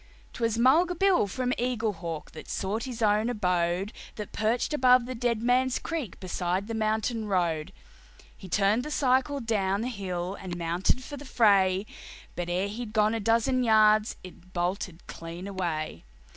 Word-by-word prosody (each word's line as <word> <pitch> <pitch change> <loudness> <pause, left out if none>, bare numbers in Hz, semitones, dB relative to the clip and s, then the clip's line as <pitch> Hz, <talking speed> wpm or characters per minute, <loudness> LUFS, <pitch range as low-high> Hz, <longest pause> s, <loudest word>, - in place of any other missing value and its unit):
'Twas 230 -2 -1
Mulga 320 +9 +4
Bill, 380 - +3
from 250 +5 -2
Eaglehawk, 210 -10 -2
that 155 - -11
sought 210 +5 -2
his 245 -3 -4
own 215 +2 +3
abode, 180 -2 0 0.2
That 210 -2 -6
perched 225 +7 0
above 250 -3 +5
the 255 - -5
Dead 235 -2 -1
Man's 255 +1 +2
Creek, 315 - -5
beside 185 +1 -2
the 225 - -5
mountain 220 +1 0
road. 175 -4 0 0.6
He 190 - -11
turned 205 +5 +2
the 300 - -6
cycle 270 0 +1
down 205 -4 0
the 245 - -2
hill 185 -5 -4
and 180 -2 -6
mounted 175 +9 0
for 290 - -7
the 285 - -9
fray, 200 -7 +3 0.5
But 175 0 -3
ere 180 +3 0
he'd 215 +1 -6
gone 215 0 +3
a 230 - -1
dozen 230 +4 +2
yards 215 -1 +4
it 185 0 -14
bolted 175 0 -3
clean 170 +2 -8
away. 170 - -3
215 Hz, 160 wpm, -28 LUFS, 185-245 Hz, 0.6 s, above